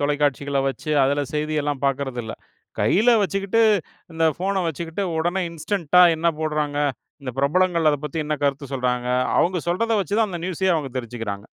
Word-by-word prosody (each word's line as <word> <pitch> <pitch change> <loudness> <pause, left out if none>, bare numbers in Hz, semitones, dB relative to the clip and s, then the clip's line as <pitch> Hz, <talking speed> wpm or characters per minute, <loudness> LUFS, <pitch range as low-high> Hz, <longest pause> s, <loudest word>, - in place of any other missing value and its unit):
தொலைக்காட்சிகள 145 -1 0
வச்சு, 155 +3 -5
அதுல 145 +1 +1
செய்தி 155 +1 -1
எல்லாம் 145 -2 -3
பாக்கறது 135 -2 -2
இல்ல. 110 - -6 0.5
கையில 220 +6 +4
வச்சுக்கிட்டு 195 +4 0 0.5
இந்த 165 0 0
ஃபோன 195 +2 -1
வச்சுக்கிட்டு 165 +4 -4 0.2
உடனே 175 +4 0
இன்ஸ்டன்ட்டா, 175 +1 +2
என்ன 170 +2 +1
போடுறாங்க, 150 -2 -1 0.5
இந்த 130 -2 -5
பிரபலங்கள் 170 +2 +2
அத 145 - +1
பத்தி, 150 +2 -4
என்ன 150 0 -1
கருத்து 140 -1 -2
சொல்றாங்க. 125 -1 -1 0.3
அவங்க 180 +1 +2
சொல்றத 225 +6 0
வச்சு 195 +4 -3
தான், 220 -2 +2
அந்த 175 -2 -5
நியூஸ் 185 +1 -3
அயே 190 - +4
அவங்க 145 -4 -4
தெரிஞ்சுக்கறாங்க. 115 -4 -6
150 Hz, 165 wpm, -22 LUFS, 140-180 Hz, 0.5 s, கையில